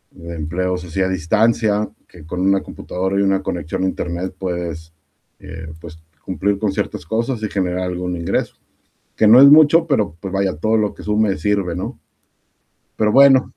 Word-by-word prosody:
de 85 0 -9
empleos 90 +3 -3
así 90 +3 -3
a 95 - +1
distancia, 105 +4 +1 0.2
que 85 -4 -15
con 90 +3 -6
una 95 0 +2
computadora 95 +2 -4
y - - +3
una 95 0 +1
conexión 85 0 -4
a - - +2
Internet 90 +1 -4
puedes, 85 -3 -5 0.5
eh, 80 -1 -9
pues, 80 -1 -11 0.3
cumplir 95 +3 -1
con 105 -3 0
ciertas 85 - -4
cosas 115 +4 -2
y 110 - -2
generar 90 -2 -1
algún 90 0 -3
ingreso, 85 0 -2 0.6
que 110 - +4
no 120 +5 +8
es 140 - +10
mucho, 155 +2 +6
pero, 105 - 0
pues, 95 -1 -6
vaya, 95 -3 0
todo 110 +8 +1
lo 105 -1 0
que - - -12
sume 105 -2 +1
sirve, 100 -4 -1
¿no?, 90 - -5 1.0
pero 105 -1 +1
bueno 135 -1 +5
95 Hz, 175 wpm, -19 LUFS, 90-105 Hz, 1.0 s, es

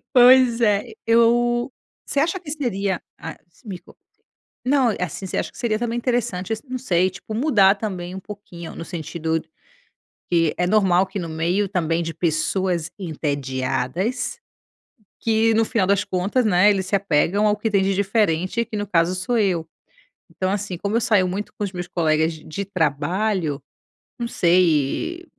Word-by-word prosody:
Pois 250 -1 +7
é. 210 +1 +2 0.2
Eu 240 +2 +3 0.3
você 280 - -1
acha 335 +6 +1
que 325 -5 -8
seria 205 -10 -2 0.2
ah 160 - -6 0.2
s 170 - -28
me 190 -5 -6
conta. - - -20 0.7
Não, 255 -4 +3
assim, 185 +1 -4
você - - -3
acha - - -2
que - - -17
seria 225 -3 0
também 235 0 -2
interessante 235 -6 -1
esse 220 - -3
não 255 0 -3
sei, 185 -7 +1
tipo, 195 +4 -8
mudar 215 -6 +4
também 185 -4 -5
um 190 - -6
pouquinho, 180 -4 -9
no 165 - -6
sentido 160 -1 -3 0.9
que, 165 -3 +3
é 180 - +1
normal 190 -2 +3
que 190 - -6
no 170 - -4
meio 170 +5 0
também 170 -3 0
de 165 0 -4
pessoas 170 +1 -1
entediadas, 150 - -2 0.8
que 225 0 +2
no 225 +1 +3
final 215 -3 0
das 200 -1 +2
contas, 195 +6 0
né, 205 -1 +5
eles 190 -2 0
se - - -2
apegam 195 +2 +2
ao 210 - +2
que 215 +2 -1
tem 200 -2 +3
de 195 +1 +1
diferente, 195 +1 +1
que 225 -1 -7
no 205 0 -2
caso 175 -2 +2
sou 185 +7 -1
eu. 180 -6 0 0.6
Então, 185 0 -2
assim, 200 -2 -3
como 200 +5 -2
eu 230 - +2
saio 205 -5 +3
muito 195 +3 -4
com - - -3
os 195 - -5
meus 180 -1 -5
colegas 160 -2 +1
de 155 - -13
de 195 +6 -5
trabalho 170 -1 -1 0.6
não 235 - -2
sei, 175 - +1
195 Hz, 175 wpm, -22 LUFS, 170-225 Hz, 0.9 s, Pois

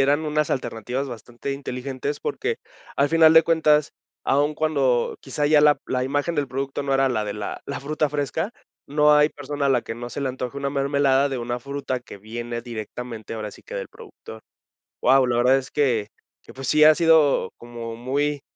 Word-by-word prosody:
eran 145 +3 +3
unas 150 0 0
alternativas 130 +2 -3
bastante 120 +3 -6
inteligentes, 135 +1 -4
porque, - - -2 0.4
al 140 +1 +3
final 160 -1 +6
de 160 0 +8
cuentas, 155 -2 +3 0.3
aún 145 +2 +2
cuando 140 -6 +1
quizá 145 +2 -2
ya 150 0 +5
la 150 -1 +5
la 125 0 -1
imagen 145 +5 -1
del 145 -2 0
producto 135 +2 -3
no 140 -1 -1
era 135 0 +3
la 110 -4 -1
de 105 - -3
la 105 -1 -6
la 140 - -5
fruta 150 +1 -1
fresca, 150 +6 -2 0.4
no 150 +1 +4
hay 150 +1 +5
persona 145 0 -3
a - - +2
la 125 -2 +3
que 115 - -6
no 120 +1 -7
se - - -5
le 135 - -1
antoje 130 +1 -5
una 140 0 -2
mermelada 140 0 +2
de 130 - -2
una 120 +1 -3
fruta 135 -1 -4
que 110 - -12
viene 120 +3 -5
directamente, 115 -1 -7
ahora 110 -2 -5
sí - - -15
que, - - -10
del - - -4
productor. 110 0 -13 0.6
Guau, 130 0 +4
la 120 -1 +1
verdad 125 +2 +4
es 135 0 -5
que 120 -8 +1 0.4
que, - - -14
pues, 135 0 -6
sí 155 0 +5
ha 155 0 +8
sido 160 - +4
como 115 -1 -7
muy 140 +4 -1
135 Hz, 200 wpm, -23 LUFS, 120-145 Hz, 0.6 s, de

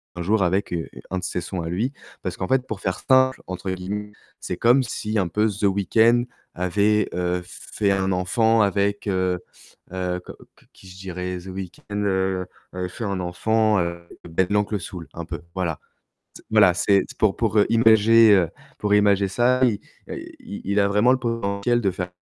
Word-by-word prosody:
un 90 - -5
jour 100 +1 +2
avec, 95 +1 0
heu, 80 -1 -3 0.2
1 95 - -1
de - - -10
ses 90 -1 -2
sons 90 +1 -4
à 80 - -4
lui, 115 +11 -1 0.3
parce 90 -2 -4
qu'en 95 - -3
fait, 130 -1 +1
pour 105 -3 -5
«faire 95 - -2
simple» 130 0 +3
entre 95 +1 -5
guillemets, 105 +3 -5 0.3
c'est - - -5
comme 125 +3 +4
si, 110 -2 -2
un 90 - +1
peu, 105 +6 +1
The 105 +1 -6
Weekend 110 +5 +3 0.3
avait, 100 +4 +1
heu, 90 0 -1
fait 100 +2 -2
1 95 0 0
enfant 110 +5 +2
avec, 100 +1 0
heu 95 -2 0 0.5
heu, 90 -1 -2
que - - -8 0.2
que - - -25
qui 95 - -17
je 90 0 -12
dirais? 90 -1 -5
The 90 - -13
Weekend, 95 +2 -6
heu 95 -1 0 0.3
heu, 90 0 -3
fait 115 +6 -7
un 100 -2 -2
enfant, 105 +4 +1
heu, 85 0 -3 0.2
Ben 90 +3 +1
l'Oncle 105 0 0
Soul, 85 -1 -8
un 85 -1 -6
peu, 85 -1 -6
voilà. 85 -5 -2 0.6
C - - -12
voilà, 105 -5 +5
c'est 100 +1 +3 0.2
pour 110 -3 +3
pour 110 -2 +1
imager, 115 -1 +6
heu, 90 -4 +3 0.3
pour 105 -1 -1
imager 100 -1 +3
ça, 125 +5 +2
il, 110 -5 +1 0.3
heu, - - -4 0.2
il - - -8
il 100 +1 +1
a 100 - +3
vraiment 105 +5 +4
le 130 - +2
potentiel 115 -1 0
de 100 -3 +1
faire 90 -1 -5
100 Hz, 195 wpm, -23 LUFS, 90-110 Hz, 0.6 s, imager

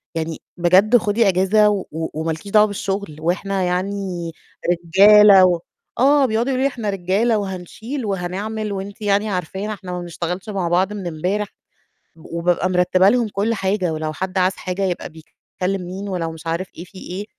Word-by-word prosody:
يعني 160 0 -3 0.2
بجد 190 +7 +5
خُدي 215 0 +1
إجازة، 195 +3 +4
و 200 -2 -1
وما 160 0 -3
لكيش 160 +6 -7
دعوة 210 0 +6
بالشغل، 195 -5 -4
وإحنا 190 +3 -1
يعني 180 -1 -2 0.5
رجالة 200 +2 +7
و 175 -2 +2 0.4
آه، 280 +2 +5
بيقعدوا 235 +2 0
يقولوا 260 0 0
لي - - +4
إحنا 225 -4 -3
رجالة 200 +4 +1
وهنشيل 205 - -5
وهنعمل، 205 +3 -3
وأنتِ 200 +1 -6
يعني 205 +1 +1
عرفانا 190 +3 -3
إحنا 185 -3 -8
ما 180 - -3
بنشتغلش 175 +3 -5
مع 190 -4 -2
بعض 185 +4 +1
من 200 -4 -5
امبارح، 180 +6 -2 0.7
وبابقى 170 +3 -1
مرتبة 185 +1 +3
لهم 240 +1 +2
كل 210 +3 -1
حاجة، 190 -4 -1
ولو 155 0 -3
حد 190 +3 -3
عاز 185 +1 +3
حاجة 185 +1 -4
يبقى 185 -2 -2
بيكلّم 180 +4 -6
مين، 190 +3 -6
ولو 170 -4 -3
مش 160 +1 -12
عارف 170 +3 -2
إيه 170 - -6
في 185 +1 -15
إيه 185 +3 -6
190 Hz, 170 wpm, -20 LUFS, 175-210 Hz, 0.7 s, رجالة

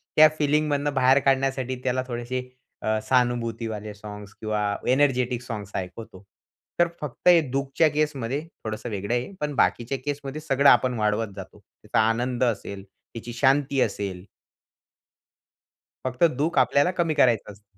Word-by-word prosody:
त्या 155 0 +9
फिलिंगमधनं 145 -1 +1
बाहेर 135 0 +4
काढण्यासाठी 135 -1 0
त्याला 130 0 0
थोडीशी 125 +1 -4 0.3
अ, 110 0 0
सहानुभूतीवाले 115 -4 -1
साँग्स 105 0 -10
किंवा 105 -1 -1
एनर्जेटिक 125 -3 +2
सॉन्ग्स 105 -5 -7
ऐकवतो. 95 +1 -7 0.6
तर 175 - +5
फक्त 150 +3 -5
हे 175 -1 +8
दुःखच्या 135 +4 +1
केसमध्ये 145 -3 -1 0.2
थोडंसं 110 +2 -5
वेगळं 100 +2 -3
आहे. 125 +9 -2
पण 150 -1 -2
बाकीच्या 125 +1 +1
केसमध्ये 145 0 -4
सगळं 140 -2 +4
आपण 125 +1 +4
वाढवत 105 0 0
जातो. 95 - -10
त्याचा - - -4
आनंद 125 +2 -1
असेल, 100 -4 -2 0.3
तिची 120 +1 -7
शांती 135 +1 +2
असेल. 95 -3 -2 1.8
फक्त 130 +4 -1
दुःख 155 +4 -1
आपल्याला 140 +6 +3
कमी 165 -2 +1
करायचं 120 -8 +2
असतं. 100 -1 -20
125 Hz, 135 wpm, -25 LUFS, 110-140 Hz, 1.8 s, त्या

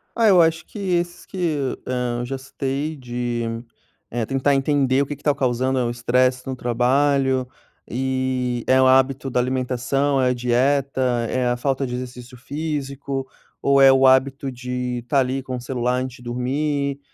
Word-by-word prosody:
Ah, 230 -1 +3
eu 185 -4 +7
acho 165 0 +1
que, - - -12
esses 175 -2 -1
que 190 - -10
eu, 150 -7 -1
hã, 125 -1 -2
já 135 +2 -4
citei 135 +3 -3
de, 120 -3 -3 0.7
eh, 115 -1 -2
tentar 135 +3 +1
entender 135 -1 +2
o - - +1
que 145 - -5
que 145 - -21
está 145 - +2
causando 130 0 0
é - - +1
o 120 - -1
estresse 125 +2 +1
no 130 - -3
trabalho 130 +2 +1 0.4
e, 130 -1 -1
é 130 0 +5
o 130 - +5
hábito 135 +1 +3
da 125 - 0
alimentação, 130 +2 0
é 130 - +3
a - - +2
dieta, 130 +3 +1 0.3
é 125 -1 0
a 120 0 0
falta 135 +2 -1
de 125 -1 -4
exercício 125 0 -8
físico, 140 -1 -4 0.3
ou 140 0 +4
é 135 0 +9
o 135 0 +4
hábito 135 +1 +2
de 125 0 -4
estar 140 +3 +1
ali 130 +1 0
com 130 -1 -5
o 125 - -5
celular 125 0 -1
antes 130 0 -5
de 125 - -15
dormir, 140 +3 -1
130 Hz, 180 wpm, -22 LUFS, 125-140 Hz, 0.7 s, é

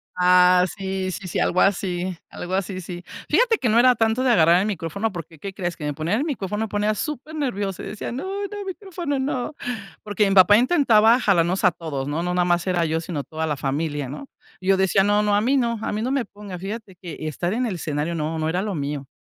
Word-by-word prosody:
Ah, 180 0 +5
sí 190 -1 -3
sí 185 0 -6
sí, - - -2
algo 180 - +2
así 185 -2 0
algo 180 +1 -7
así, 190 -1 -2
sí. 175 0 -8 0.3
Fíjate 470 -3 +3
que 240 - 0
no 230 +2 +4
era 250 0 +6
tanto 225 +3 +1
de 255 - +3
agarrar 170 -3 +5
el 200 - 0
micrófono, 200 +3 -2
porque, 165 -3 -9
¿qué 195 -1 -6
crees? 175 -2 -3
Que 150 - -6
me 145 - -1
ponían 165 - -1
el 290 - -1
micrófono, 215 - -2
me - - -7
ponía 210 +1 0
supernerviosa, 265 - -3
y - - -6
decía: 210 - -5
"No 260 +7 -4 0.2
no, 410 -1 -7
micrófono, 360 -6 -4
no", 265 +2 -2 0.5
porque 205 -1 +1
mi 195 - +1
papá 195 +3 +8
intentaba 240 -4 +4
jalarnos 185 -3 +2
a 185 - +6
todos, 145 -5 -5
¿no? 155 +3 -2
No 180 0 -1
nada 180 -1 +2
más 175 0 +1
era 175 -2 +1
yo, 160 +1 0
sino 160 -4 -4
toda 160 0 -4
la 150 -2 -1
familia, 145 0 -2
¿no? 265 - -8 0.3
Y 185 - -8
yo 195 - +5
decía: 190 0 +3
"No 205 +1 +3
no, 205 -1 +2
a 205 - +3
mí 270 +5 +2
no 235 -3 0
a - - -2
mí 210 +1 -2
no 255 +3 -1
me 275 -4 0
pongas", 200 -4 -9
y - - -7
fíjate 210 -2 -6
que 170 -2 -9
estar 175 +5 -2
en 250 +2 0
el 210 - -2
escenario 155 0 -2
no 160 +1 -2
no 155 0 0
era 180 +3 0
lo 205 -2 -3
mío. 140 -2 -4
190 Hz, 245 wpm, -23 LUFS, 170-225 Hz, 0.5 s, papá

